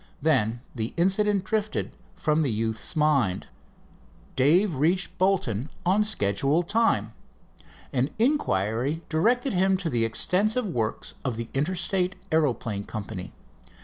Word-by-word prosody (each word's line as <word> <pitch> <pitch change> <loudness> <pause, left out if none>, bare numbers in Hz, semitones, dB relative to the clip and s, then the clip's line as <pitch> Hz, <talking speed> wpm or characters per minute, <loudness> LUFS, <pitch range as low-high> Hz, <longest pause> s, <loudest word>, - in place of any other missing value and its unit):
Then 120 -7 +1
the 110 -2 -4
incident 195 +2 +2
drifted 215 +1 -2 0.2
from 160 -4 +1
the 145 - +1
youth's 110 0 -2
mind. 140 -11 +2 0.9
Dave 160 +5 +3
reached 170 +5 +1
Bolton 160 - +1 0.2
on 195 +4 +3
schedule 140 - +1
time. 175 - +1 0.8
An 130 +1 +1
inquiry 145 - 0
directed 240 - +1
him 190 +1 +3
to 175 -4 -3
the 115 -1 +1
extensive 205 - +1
works 115 - -3
of 125 -4 -2
the 115 0 -5
Interstate 180 +5 0 0.2
Aeroplane 125 -10 0
Company. 100 -4 -6
155 Hz, 115 wpm, -26 LUFS, 115-190 Hz, 0.9 s, Dave